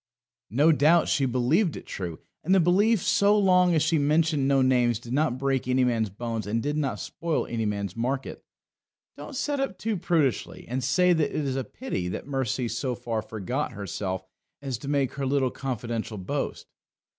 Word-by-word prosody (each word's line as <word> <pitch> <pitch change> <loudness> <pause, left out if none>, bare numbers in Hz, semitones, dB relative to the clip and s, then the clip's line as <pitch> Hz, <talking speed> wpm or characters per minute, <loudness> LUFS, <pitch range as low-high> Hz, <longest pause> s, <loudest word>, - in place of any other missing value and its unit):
No 145 +8 +4
doubt 155 +3 +4
she 135 -2 +2
believed 135 - +2
it - - -10
true. 85 -4 -5 0.2
And 185 +4 +3
the - - +5
belief 190 +4 +3
so 205 0 +4
long 180 -3 +4
as 155 - +3
she 160 0 +2
mentioned 150 -1 +2
no 135 -1 +4
names, 125 -3 +3
did 120 +1 -8
not 145 -3 +1
break 135 -1 -1
any 130 0 +3
man's 115 -4 +1
bones 110 +1 -4
and 115 +2 -1
did 145 +1 -1
not 135 -9 -1
spoil 165 - -2
any 115 -2 -2
man's 100 -2 -3
market. 130 +4 -3 0.7
Don't 290 - -9
set 285 +2 -1
up 270 - -2
too 220 -1 -2
prudishly 165 -7 0
and 125 +2 -2
say 180 +8 +3
that 160 -3 +1
it 150 - -2
is 135 -1 -1
a 135 - -1
pity 230 - -4
that 90 - -5
Mercy 130 -3 -1
so 125 +2 -2
far 115 -2 -3
forgot 110 +6 -3
herself 95 -1 -4 0.3
as 135 -5 -4
to 140 - -8
make 140 -3 0
her 140 -1 -3
little 135 -2 +1
confidential 115 -4 -4
boast. 95 - -3
135 Hz, 190 wpm, -26 LUFS, 115-160 Hz, 0.7 s, the